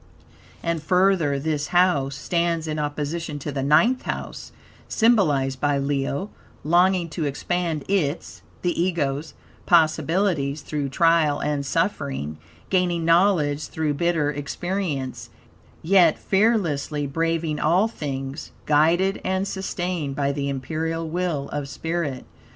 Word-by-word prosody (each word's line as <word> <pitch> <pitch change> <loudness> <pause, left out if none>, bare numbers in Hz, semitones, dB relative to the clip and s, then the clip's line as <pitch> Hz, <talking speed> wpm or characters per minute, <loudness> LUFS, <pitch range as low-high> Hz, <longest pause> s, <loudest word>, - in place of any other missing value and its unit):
And 170 -1 -1
further, 180 -4 +2
this 150 +1 -2
house 165 -7 +2
stands 170 +2 -1
in 155 0 -2
opposition 150 +1 -3
to 145 +1 -5
the 135 -1 -3
Ninth 160 - +4
House, - - -5 0.4
symbolized 150 - +2
by 145 -1 +2
Leo; 140 +6 -2 0.3
longing 175 +2 +3
to 155 0 -3
expand 160 +2 -2
its 175 -6 -1 0.2
(the 175 -1 +1
Ego's) 155 -4 -1 0.3
possibilities 160 -2 +2
through 145 -2 -3
trial 165 -1 +3
and 145 -1 -1
suffering; 135 - -2 0.3
gaining 175 -3 +1
knowledge 165 -4 +3
through 155 -2 -1
bitter 160 -1 +1
experience; 145 -1 -3 0.5
yet 175 -2 +5
fearlessly 175 -9 +1
braving 165 +1 -1
all 180 +7 +3
things; 140 -7 -5 0.2
guided 165 +6 +3
and 190 +1 -1
sustained 180 -6 -3
by 140 0 0
the 140 0 -2
imperial 160 +4 -3
will 165 -4 -2
of 145 -2 -4
spirit. 160 -5 -3
160 Hz, 115 wpm, -23 LUFS, 145-175 Hz, 0.5 s, yet